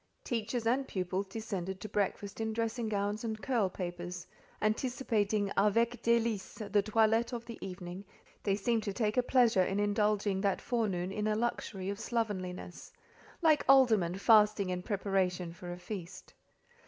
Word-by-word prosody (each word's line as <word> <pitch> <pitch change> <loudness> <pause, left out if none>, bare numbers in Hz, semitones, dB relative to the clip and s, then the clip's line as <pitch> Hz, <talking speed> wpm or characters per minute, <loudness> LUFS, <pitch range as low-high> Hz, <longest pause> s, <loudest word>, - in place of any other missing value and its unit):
Teachers 230 0 -2
and 260 +4 +1
pupils 185 +1 -2
descended 190 -3 -4
to 215 - -6
breakfast 205 0 -2
in 220 0 -1
dressing 230 0 -1
gowns 205 +1 -1
and 220 -2 -3
curl 230 -6 +1
papers: 175 -1 -5 0.3
anticipating 215 -3 0
"avec 230 +4 +2
délices" 225 -3 0
the 205 - +4
toilette 225 +3 +2
of 235 -1 -4
the 235 -1 -8
evening, 180 0 -7 0.4
they 195 -2 +1
seemed 225 +3 +1
to 200 -2 -3
take 215 -1 0
a 250 - +4
pleasure 245 -6 +4
in 195 +2 0
indulging 205 -1 +1
that 195 -2 +1
forenoon 195 -7 -1
in 210 +2 -2
a 215 - +1
luxury 215 -4 -2
of 200 0 -3
slovenliness; 190 -7 -3 0.5
like 310 -2 +5
aldermen 220 -10 +5
fasting 210 -2 +4
in 180 0 -2
preparation 185 -4 -1
for 175 0 -8
a 175 - -5
feast. 185 -1 -8
210 Hz, 155 wpm, -32 LUFS, 190-225 Hz, 0.5 s, like